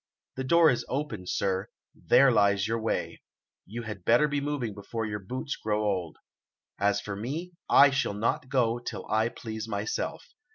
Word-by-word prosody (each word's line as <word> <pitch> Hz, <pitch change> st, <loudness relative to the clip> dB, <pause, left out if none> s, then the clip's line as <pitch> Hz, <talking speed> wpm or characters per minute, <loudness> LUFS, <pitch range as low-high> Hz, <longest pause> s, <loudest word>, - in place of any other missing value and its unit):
The 130 Hz, -, -3 dB
door 165 Hz, +4 st, +5 dB
is 120 Hz, -, -1 dB
open, 135 Hz, -10 st, -3 dB
sir; 95 Hz, +1 st, -1 dB, 0.3 s
there 135 Hz, -1 st, +4 dB
lies 100 Hz, -2 st, +3 dB
your 115 Hz, 0 st, -1 dB
way; 110 Hz, -, -2 dB, 0.5 s
you 115 Hz, +4 st, -6 dB
had 105 Hz, -4 st, -7 dB
better 120 Hz, +9 st, +4 dB
be 145 Hz, -1 st, -1 dB
moving 140 Hz, -7 st, -2 dB
before 110 Hz, +3 st, -5 dB
your 105 Hz, -1 st, -3 dB
boots 130 Hz, +8 st, -4 dB
grow 105 Hz, 0 st, -1 dB
old. 95 Hz, -6 st, -2 dB, 0.6 s
As 100 Hz, 0 st, +2 dB
for 105 Hz, -1 st, -5 dB
me, 145 Hz, -, -4 dB, 0.2 s
I 140 Hz, 0 st, +7 dB
shall 135 Hz, -6 st, 0 dB
not 115 Hz, +4 st, -1 dB
go 120 Hz, -3 st, +1 dB
till 120 Hz, -, -6 dB
I 110 Hz, +2 st, +2 dB
please 110 Hz, -2 st, -6 dB
myself. 105 Hz, 0 st, -4 dB
115 Hz, 170 wpm, -28 LUFS, 100-130 Hz, 0.6 s, I